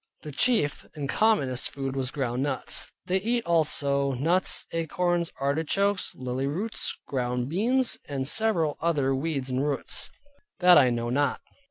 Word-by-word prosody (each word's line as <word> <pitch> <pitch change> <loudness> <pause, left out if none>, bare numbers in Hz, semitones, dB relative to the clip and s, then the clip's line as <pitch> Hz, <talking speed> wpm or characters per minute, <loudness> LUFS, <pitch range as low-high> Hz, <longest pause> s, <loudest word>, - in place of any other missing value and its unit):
The 150 - -7
chief 150 - +1
and 145 -2 -4
commonest 135 - +1
food 135 -1 -4
was 130 -2 -2
ground 130 -3 -2
nuts. 140 -2 -1
They 185 0 +1
eat 235 +2 0
also 140 -4 +1
nuts 165 +9 +2
and 165 - 0
acorns, 175 +1 -1
artichokes, 165 +8 0
lilly 130 +1 -3
roots, 195 +10 -2
ground 125 -1 -2
beans, 240 - +1
and 135 -2 -2
several 170 -6 +2
other 145 -5 +1
weeds 135 -2 -2
and 130 +2 0
roots, 145 -2 -2 0.5
that 180 0 +7
I 130 -3 +5
know 120 0 -2
not. 140 +1 +1
145 Hz, 150 wpm, -27 LUFS, 135-180 Hz, 0.5 s, that